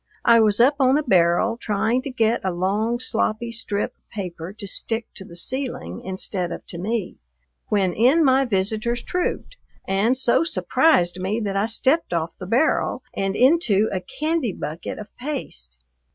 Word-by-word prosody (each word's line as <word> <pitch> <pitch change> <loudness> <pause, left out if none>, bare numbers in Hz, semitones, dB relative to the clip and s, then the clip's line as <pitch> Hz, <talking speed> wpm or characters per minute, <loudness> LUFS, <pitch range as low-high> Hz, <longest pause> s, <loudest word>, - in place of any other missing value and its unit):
I 235 -1 +7
was 215 -1 +3
up 270 +4 +5
on 265 +1 +4
a 305 - 0
barrel 185 +1 +3
trying 220 +3 0
to 275 - -5
get 230 -3 +1
a 190 - 0
long, 205 +7 0
sloppy 230 -1 -1
strip 210 -2 -3
of - - -47
paper 180 -4 -6
to 205 0 -9
stick 225 +3 -2
to 190 - -10
the 170 - -13
ceiling 175 - -3
instead 185 -1 -3
of - - -7
to 170 - -6
me, 210 0 -3 0.5
when 195 -4 +1
in 265 - +4
my 265 0 +4
visitors 220 +3 0
trooped, 360 +7 -3 0.3
and 205 +7 +2
so 255 +3 +3
surprised 185 - +2
me 195 +5 -1
that 200 -2 -2
I 200 +2 +1
stepped 265 - +2
off 165 0 -2
the 185 - -7
barrel 255 +10 +1
and 195 0 -2
into 245 - +3
a 185 - -2
candy 305 - -2
bucket 155 +2 -6
of 210 -1 -10
paste. 245 - -6
220 Hz, 170 wpm, -22 LUFS, 190-250 Hz, 0.5 s, I